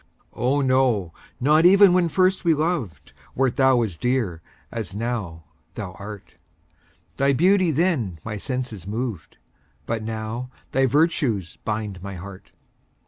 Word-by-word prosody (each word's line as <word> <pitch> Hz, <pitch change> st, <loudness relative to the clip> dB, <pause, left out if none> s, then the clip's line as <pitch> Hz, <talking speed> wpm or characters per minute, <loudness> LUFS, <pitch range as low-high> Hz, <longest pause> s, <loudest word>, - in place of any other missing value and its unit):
Oh, 135 Hz, +4 st, +1 dB
no 130 Hz, -10 st, +2 dB, 0.3 s
not 150 Hz, +5 st, +4 dB
even 195 Hz, +1 st, +7 dB
when 180 Hz, -2 st, +3 dB
first 185 Hz, +3 st, +2 dB
we 165 Hz, -3 st, +4 dB
loved, 155 Hz, -, -3 dB, 0.2 s
Wert 130 Hz, -2 st, +1 dB
thou 130 Hz, -3 st, +4 dB
as 95 Hz, -7 st, -4 dB
dear 115 Hz, -9 st, -1 dB, 0.3 s
as 110 Hz, -5 st, -5 dB
now 105 Hz, -8 st, -3 dB, 0.3 s
thou 100 Hz, -4 st, -5 dB
art; 100 Hz, +1 st, -10 dB, 0.8 s
Thy 140 Hz, +1 st, +3 dB
beauty 185 Hz, +5 st, +4 dB
then 150 Hz, -, 0 dB
my 110 Hz, -1 st, -4 dB
senses 120 Hz, -, -4 dB
moved, 110 Hz, -4 st, -4 dB, 0.5 s
But 115 Hz, -1 st, -2 dB
now 110 Hz, +3 st, -4 dB, 0.2 s
thy 135 Hz, 0 st, +3 dB
virtues 140 Hz, -, +1 dB
bind 105 Hz, -4 st, -3 dB
my 100 Hz, 0 st, -6 dB
heart. 95 Hz, +1 st, -10 dB
120 Hz, 135 wpm, -23 LUFS, 100-145 Hz, 0.8 s, even